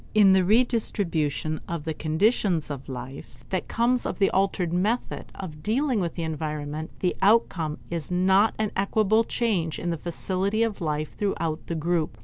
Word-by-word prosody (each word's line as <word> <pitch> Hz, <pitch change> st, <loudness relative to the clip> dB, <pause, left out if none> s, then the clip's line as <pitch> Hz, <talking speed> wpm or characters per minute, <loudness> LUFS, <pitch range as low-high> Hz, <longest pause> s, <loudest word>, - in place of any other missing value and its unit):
In 200 Hz, -3 st, +7 dB
the 190 Hz, -1 st, +4 dB
redistribution 180 Hz, -, +1 dB
of 170 Hz, -3 st, -4 dB
the 160 Hz, -, -1 dB
conditions 165 Hz, +1 st, +1 dB
of 140 Hz, -1 st, -7 dB
life 125 Hz, -2 st, -8 dB
that 185 Hz, -, -1 dB
comes 240 Hz, +1 st, +2 dB
of -, -, -3 dB
the 195 Hz, -, +3 dB
altered 190 Hz, -3 st, +1 dB
method 210 Hz, +7 st, -1 dB
of 155 Hz, -5 st, -7 dB
dealing 245 Hz, -, +1 dB
with 170 Hz, -4 st, -2 dB
the 170 Hz, -, -3 dB
environment, 155 Hz, -1 st, -4 dB
the 180 Hz, -, +1 dB
outcome 190 Hz, -7 st, +2 dB
is 170 Hz, -3 st, -3 dB
not 190 Hz, +4 st, +3 dB
an 215 Hz, -1 st, -1 dB
equable 215 Hz, +3 st, +2 dB
change 195 Hz, -10 st, -1 dB
in 175 Hz, -, -2 dB
the 165 Hz, -, -2 dB
facility 190 Hz, +6 st, -1 dB
of 220 Hz, -4 st, -2 dB
life 155 Hz, -2 st, -2 dB
throughout 165 Hz, -6 st, -2 dB
the 170 Hz, -, -2 dB
group. 160 Hz, -5 st, -1 dB
180 Hz, 165 wpm, -26 LUFS, 155-210 Hz, -, In